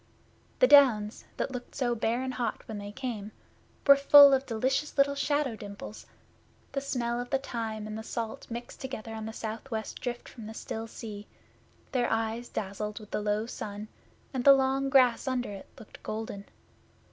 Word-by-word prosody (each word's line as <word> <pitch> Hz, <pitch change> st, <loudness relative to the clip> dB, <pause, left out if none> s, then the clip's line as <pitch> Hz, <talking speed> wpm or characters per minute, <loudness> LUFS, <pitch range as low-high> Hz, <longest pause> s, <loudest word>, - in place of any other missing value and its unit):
The -, -, +6 dB
Downs, 250 Hz, -7 st, +5 dB
that -, -, -2 dB
looked 250 Hz, -1 st, -7 dB
so 250 Hz, -3 st, +1 dB
bare 235 Hz, +2 st, 0 dB
and 260 Hz, 0 st, -3 dB
hot 240 Hz, -3 st, -3 dB
when 215 Hz, -2 st, -5 dB
they 205 Hz, 0 st, -7 dB
came, 215 Hz, -3 st, -5 dB, 0.5 s
were 280 Hz, -, +9 dB
full 280 Hz, 0 st, +9 dB
of 270 Hz, 0 st, +1 dB
delicious 260 Hz, +6 st, -1 dB
little 280 Hz, 0 st, +4 dB
shadow 285 Hz, -3 st, 0 dB
dimples; 205 Hz, 0 st, -9 dB, 0.6 s
the 275 Hz, -, -2 dB
smell 240 Hz, -3 st, -1 dB
of 245 Hz, -, -7 dB
the 270 Hz, -, +2 dB
thyme 225 Hz, -5 st, -4 dB
and 215 Hz, 0 st, -5 dB
the 220 Hz, -, -4 dB
salt 225 Hz, 0 st, -5 dB
mixed 235 Hz, +1 st, -7 dB
together 230 Hz, -4 st, -6 dB
on 220 Hz, 0 st, -5 dB
the -, -, -4 dB
south 220 Hz, +3 st, -6 dB
west 220 Hz, -3 st, -4 dB
drift 240 Hz, -1 st, -4 dB
from 225 Hz, -4 st, -10 dB
the 220 Hz, -, -8 dB
still 225 Hz, 0 st, -5 dB
sea; 210 Hz, -2 st, -8 dB, 0.6 s
their 250 Hz, -2 st, +1 dB
eyes 225 Hz, +1 st, -1 dB
dazzled 210 Hz, +2 st, -4 dB
with 210 Hz, -1 st, -13 dB
the -, -, -1 dB
low 210 Hz, +1 st, 0 dB
sun, 210 Hz, -2 st, -6 dB, 0.4 s
and 255 Hz, -2 st, -1 dB
the 275 Hz, -, +9 dB
long 270 Hz, 0 st, +1 dB
grass 255 Hz, -2 st, +4 dB
under 250 Hz, -4 st, -1 dB
it 195 Hz, -1 st, -9 dB
looked 215 Hz, -, -13 dB
golden. 215 Hz, -2 st, -5 dB
235 Hz, 180 wpm, -29 LUFS, 215-265 Hz, 0.6 s, were